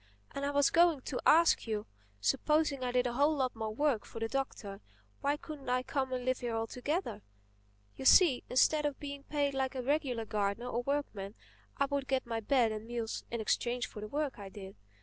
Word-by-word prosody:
And 280 - -5
I - - 0
was 285 -1 +3
going 335 -4 +4
to 255 0 -4
ask 330 -5 +5
you: 215 -2 -2 0.3
supposing 280 - +1
I 250 - -1
did 250 0 +2
a 245 - -1
whole 290 +5 +3
lot 260 -4 -1
more 220 -1 -3
work 250 0 +1
for 225 - -9
the 225 - -1
Doctor—why 200 - -4
couldn't 295 -3 -8
I 250 0 +1
come 265 0 -2
and 250 -1 -3
live 255 0 +1
here 240 -2 -3
altogether? 250 - -2 0.7
You 265 - -7
see, 295 -4 +6
instead 295 +4 +3
of 285 - -5
being 280 -1 -6
paid 285 -1 -1
like 265 0 -1
a 255 - -3
regular 265 -4 0
gardener 210 +3 -1
or 240 0 -1
workman, 240 -7 -3 0.4
I 280 - +3
would 280 -1 -2
get 265 -1 0
my 230 -1 -2
bed 230 0 +2
and 215 +1 -6
meals 235 -2 -3
in 235 -1 -3
exchange 240 +3 0
for 210 - -9
the 215 - -5
work 285 0 -2
I 200 -1 -7
did. 195 -1 -10
255 Hz, 205 wpm, -32 LUFS, 225-285 Hz, 0.7 s, see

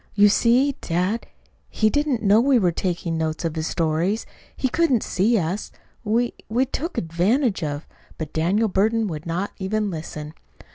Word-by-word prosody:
"You 205 0 +6
see, 250 +6 +3
dad, 180 +7 -1 0.4
he 215 0 +2
didn't 290 -5 0
know 210 +2 +5
we 265 0 +4
were 185 -6 +3
taking 170 -1 -2
notes 160 +1 -2
of 165 -1 -2
his 160 0 -2
stories. 170 +6 0 0.3
He 260 - +1
couldn't 270 -4 +2
see 220 +6 +2
us. 180 +2 -2 0.3
We 235 +2 +1 0.2
we 245 +4 +2
took 305 +6 -4
advantage 190 - +1
of 145 0 -3 0.2
" - - -26
But 155 -2 -6
Daniel 190 +8 +2
Burton 215 +3 +1
would 160 -4 -5
not 180 +4 -2
even 205 +1 -1
listen. 155 -2 -6
200 Hz, 170 wpm, -23 LUFS, 165-230 Hz, 0.4 s, You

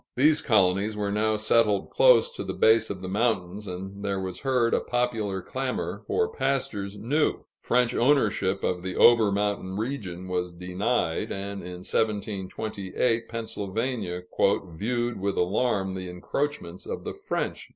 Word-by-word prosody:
Those 150 +4 +4
colonies 100 0 +2
were 100 -1 -1
now 110 +1 +1
settled 105 -1 +2
close - - +5
to 480 - -6
the - - -4
base 110 0 +4
of 95 -2 -5
the - - -4
mountains, 105 -1 -1
and 95 +2 -6
there 100 -1 -1
was 95 -1 -5
heard 125 -4 +1
a - - +4
popular 115 -6 -1
clamor 130 +3 -3
for 445 - +1
pastures 105 - -1
new. 145 +9 0 0.2
French 125 -1 +2
ownership 110 -8 +2
of 90 -1 0
the 95 0 -4
over 115 -3 +6
mountain 100 -2 -1
region 105 -7 -4
was 90 -1 -2
denied, 90 +1 -1
and 100 0 -4
in 90 0 -8
1728 110 +2 -1
Pennsylvania 110 -3 -3 0.5
"viewed 120 +7 -2
with 100 +1 -1
alarm 95 +1 +1
the 95 -1 -5
encroachments 90 - -4
of - - -4
the - - -4
French." - - -4
105 Hz, 145 wpm, -26 LUFS, 95-120 Hz, 0.5 s, over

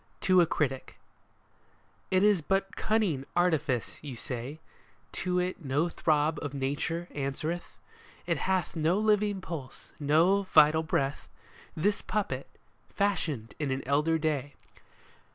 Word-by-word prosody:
TO 185 -1 +5
A 170 - +3
CRITIC 135 -5 -2 0.6
" - - -36
It 185 - +4
is 205 -4 +4
but 195 +4 -1
cunning 210 -11 +1
artifice," 155 -9 +1
you 140 -4 -7
say? 125 +5 -6 0.3
" - - -34
To 180 -1 0
it 180 0 -1
no 145 +5 +1
throb 155 -1 +1
of 145 -1 -5
nature 145 +5 -2
answereth? 150 +5 -4 0.5
It - - 0
hath 185 -4 0
no 165 +3 +2
living 210 -2 +2
pulse, 160 -8 -8
no 165 +7 +4
vital 160 -4 +5
breath, 140 -3 -1 0.5
This 205 +6 +1
puppet, 210 -1 -2 0.4
fashioned 160 - -1
in 150 -3 -1
an 130 0 -2
elder 150 +4 +2
day. 145 -3 -2
160 Hz, 135 wpm, -29 LUFS, 145-185 Hz, 0.6 s, TO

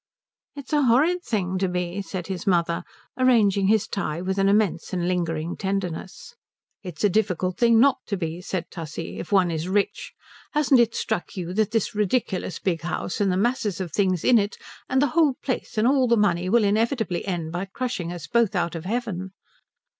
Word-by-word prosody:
"It's 280 +1 -8
a 295 - +4
horrid 290 +9 +3
thing 190 - -2
to 190 - +1
be," 180 +2 -2
said 185 -3 -5
his 185 -1 -5
mother, 170 -2 +1 0.4
arranging 210 -6 +4
his 220 +1 +3
tie 160 -5 -3
with 190 +2 -2
an 195 0 +3
immense 200 -4 +1
and 175 -1 -1
lingering 170 -2 -1
tenderness. 190 - -4 0.5
"It's 180 -6 -7
a - - +6
difficult 185 -3 0
thing 235 -1 +5
not 275 +2 +4
to 200 - -2
be," 165 0 -4
said 180 -2 -3
Tussie, 165 -1 -6
"if - - -7
one 185 -4 +4
is 160 +2 -3
rich. 200 +1 -1 0.4
Hasn't 290 -4 +4
it 235 -1 +3
struck 175 - -3
you 180 -1 -4
that 215 +1 +1
this 225 -2 -1
ridiculous 205 -4 -1
big 170 -4 -1
house, 175 +4 -3
and 195 -2 +2
the 180 - 0
masses 210 -3 0
of 180 -4 -4
things 185 -1 +1
in 240 -2 +5
it, 205 +1 -2 0.3
and 265 +1 +3
the - - +3
whole 310 -5 +4
place 255 -3 -3
and 215 +2 +3
all 265 -1 +3
the 235 0 +3
money 185 -4 +1
will 235 +2 +4
inevitably 215 -2 0
end 170 -4 -3
by 175 +3 -3
crushing 195 -4 -4
us 175 -3 -7
both 220 +5 +1
out 170 -2 0
of 165 0 -6
heaven?" 195 -4 -3
195 Hz, 195 wpm, -24 LUFS, 175-230 Hz, 0.5 s, a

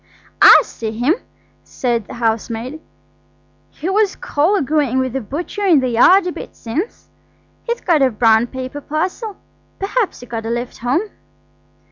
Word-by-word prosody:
"I - - +9
see 225 - -6
him," 245 +8 +2 0.5
said 235 -4 -2
the - - -9
housemaid. 230 +4 -2 0.9
"He 325 - -7
was 400 +1 +2
colloguing 295 - +1
with 260 -2 0
the 270 - -2
butcher 335 - -5
in 350 -7 +5
the 255 -1 0
yard 355 +12 +5
a 360 - -1
bit - - -9
since. 280 - -5 0.6
He'd 470 0 -3
got 325 -5 +3
a 265 - +5
brown 225 0 +3
paper 260 +3 -6
parcel. 370 - -3 0.4
Perhaps 400 - -2
he - - -9
got 225 -2 -5
a - - -3
lift 240 +1 -4
home." 255 - 0
270 Hz, 150 wpm, -18 LUFS, 235-360 Hz, 0.9 s, I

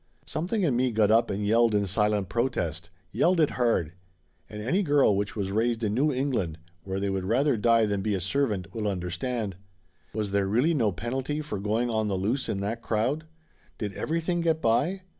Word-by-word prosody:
Something 185 +6 -2
in 145 -8 +2
me 125 +1 +2
got 110 -2 +2
up 115 +1 +4
and 100 +1 -2
yelled 115 +1 +3
in 100 -1 +2
silent 105 0 +1
protest; 85 -10 -2 0.2
yelled 180 0 +2
it 155 - +3
hard. 115 -10 +1 0.6
And 105 - -7
any 150 - +1
girl 145 - +3
which 100 +1 -2
was 100 -3 -2
raised 115 +2 0
in 105 -1 0
New 145 +6 +2
England, 125 - -1 0.3
where 95 0 -3
they 100 0 -1
would 95 -1 -2
rather 130 +7 +2
die 115 +1 +3
than 100 -2 -1
be 105 0 0
a - - -1
servant, 100 -2 -1
will 110 -2 -2
understand. 95 +3 -3 0.5
Was 105 -2 -3
there 100 -1 +1
really 125 +12 +2
no 115 -9 +2
penalty 130 - -3
for 145 -10 -4
going 110 +4 0
on 110 -1 0
the 100 -2 -1
loose 115 +8 -1
in 100 - -2
that 110 +4 -3
crowd? 125 +10 -1 0.5
Did 105 -3 -4
everything 165 +2 -1
get 165 -1 +1
by? 160 +11 +1
110 Hz, 195 wpm, -27 LUFS, 100-135 Hz, 0.6 s, up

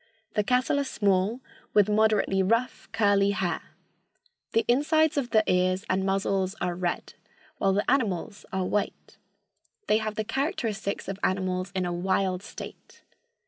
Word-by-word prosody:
The 210 - +1
cattle 255 +5 +2
are - - +1
small, 205 -1 +1 0.3
with 205 -2 +6
moderately 210 -2 +3
rough, 230 +6 0
curly 200 -2 +3
hair. 185 -4 -1 0.9
The 225 - +2
insides 310 +5 +3
of 275 -4 -1
the 220 -2 +4
ears 185 +2 +1
and 190 +1 +1
muzzles 195 0 0
are 180 - -1
red, 175 0 -3 0.5
while 195 -1 +3
the 205 +2 0
animals 205 -6 0
are 190 -1 -1
white. 205 +2 -3 0.7
They 215 - +3
have 215 -1 -3
the 215 - -1
characteristics 225 - -2
of 195 0 -4
animals 185 0 0
in 185 -1 0
a 175 - -2
wild 185 +1 0
state. 210 - -11
200 Hz, 145 wpm, -27 LUFS, 185-225 Hz, 0.9 s, with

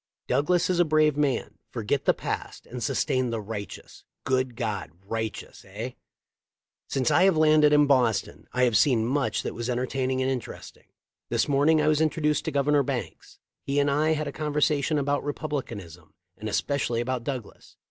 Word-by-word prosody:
Douglas 150 +7 +2
is 180 -1 0
a - - +7
brave 155 -2 +3
man. 145 -3 -1
Forget 120 +4 -2
the - - +5
past - - -5
and 125 0 -7
sustain 130 +2 0
the 115 -1 -2
right 105 -1 -5
eous.' - - -12 0.2
Good 130 -2 0
God, 110 -7 -3 0.2
righteous, 110 -1 -5
eh! 110 +6 -5 1.0
"Since 130 -3 +1
I 180 - +5
have 190 -4 +4
landed 155 -1 +5
in 150 0 +5
Boston 125 -6 +1
I 125 - +1
have 120 -3 +3
seen 115 -2 +4
much 135 +3 0
that - - -4
was 120 +1 -4
entertaining 130 +1 -1
and 130 0 +1
interesting. 125 -4 -7 0.4
This - - +1
morn 145 +2 +3
ing 160 -1 +5
I - - +1
was 155 0 +3
introduced 155 -1 +1
to - - -1
Governor 145 +1 +3
Banks. 135 - -5 0.2
He 140 +1 -1
and 145 0 +2
I 155 +3 +2
had 155 -1 -2
a - - -3
conversation 150 0 0
about 145 0 0
Republicanism 115 - -5 0.2
and 110 - -5
especially 120 0 0
about 125 0 -2
Douglas. 125 -5 -7
135 Hz, 180 wpm, -26 LUFS, 120-150 Hz, 1.0 s, a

